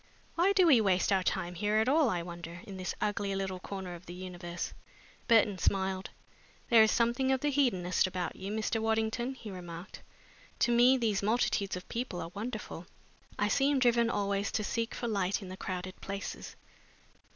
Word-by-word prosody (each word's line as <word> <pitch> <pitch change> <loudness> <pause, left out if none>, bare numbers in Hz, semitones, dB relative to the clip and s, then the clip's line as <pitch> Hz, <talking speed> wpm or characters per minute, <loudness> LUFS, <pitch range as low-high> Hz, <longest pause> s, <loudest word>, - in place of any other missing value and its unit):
Why 355 +4 +3
do 380 -2 +5
we 270 -9 +6
waste 190 -1 +2
our 190 -1 +4
time 175 -1 -1
here 210 +4 0
at 220 +2 +3
all, 290 0 +4
I 175 -4 -1
wonder, 170 0 -8
in 195 -2 -9
this 185 0 -3
ugly 200 -1 -1
little 190 -1 -3
corner 190 -1 -6
of 175 +1 -11
the 175 - -7
universe?" 175 -1 -6 0.5
Burton 210 -5 +4
smiled. 190 +1 0 0.6
"There 230 -1 +8
is 220 - +6
something 240 +4 +2
of 265 -1 +1
the 295 - +1
hedonist 190 -11 +2
about 185 -1 -3
you, 195 +2 -6
Mr. 220 +1 -1
Waddington," 225 +3 0
he 220 -5 -9
remarked. 175 0 -8 0.6
"To 240 - +4
me 245 +2 +6
these 220 -5 0
multitudes 205 -2 +1
of 180 - -8
people 235 -6 -4
are 165 - -6
wonderful. 210 -5 -6 0.5
I 210 - +2
seem 275 +5 +2
driven 235 -2 +3
always 200 -2 0
to 215 - 0
seek 230 +2 -2
for 240 - -3
light 200 -3 0
in 190 - -9
the 185 - -6
crowded 185 0 -5
places." 200 0 -6
205 Hz, 185 wpm, -31 LUFS, 185-235 Hz, 0.6 s, There